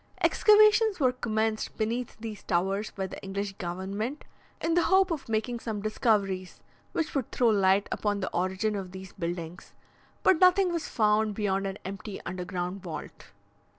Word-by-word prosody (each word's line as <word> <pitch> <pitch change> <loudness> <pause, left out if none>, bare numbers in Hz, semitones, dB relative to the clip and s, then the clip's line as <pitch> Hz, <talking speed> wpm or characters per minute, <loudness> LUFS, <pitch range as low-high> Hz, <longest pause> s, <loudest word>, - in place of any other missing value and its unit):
Excavations 425 -1 +5
were 260 -3 +4
commenced 220 -3 -2
beneath 230 +3 -2
these 220 -2 -6
towers 195 +4 0
by 195 - -4
the 190 - -8
English 195 +1 -4
government 195 - -4 0.4
in 330 - 0
the 350 - +4
hope 380 -1 +4
of 305 -7 -4
making 225 +2 -1
some 220 -3 -4
discoveries 200 -3 0 0.3
which 320 -2 -2
would 270 -5 -2
throw 240 -2 +3
light 195 -1 +3
upon 205 -1 -1
the 185 - -3
origin 190 +4 0
of 190 -2 -5
these 190 -1 -9
buildings; 170 +1 -5 0.5
but 370 - +5
nothing 365 0 +5
was 335 -2 -2
found 215 -1 +2
beyond 195 -2 0
an 195 0 -5
empty 195 +1 -6
underground 180 +1 -4
vault. 175 -3 -8
210 Hz, 155 wpm, -28 LUFS, 190-245 Hz, 0.5 s, Excavations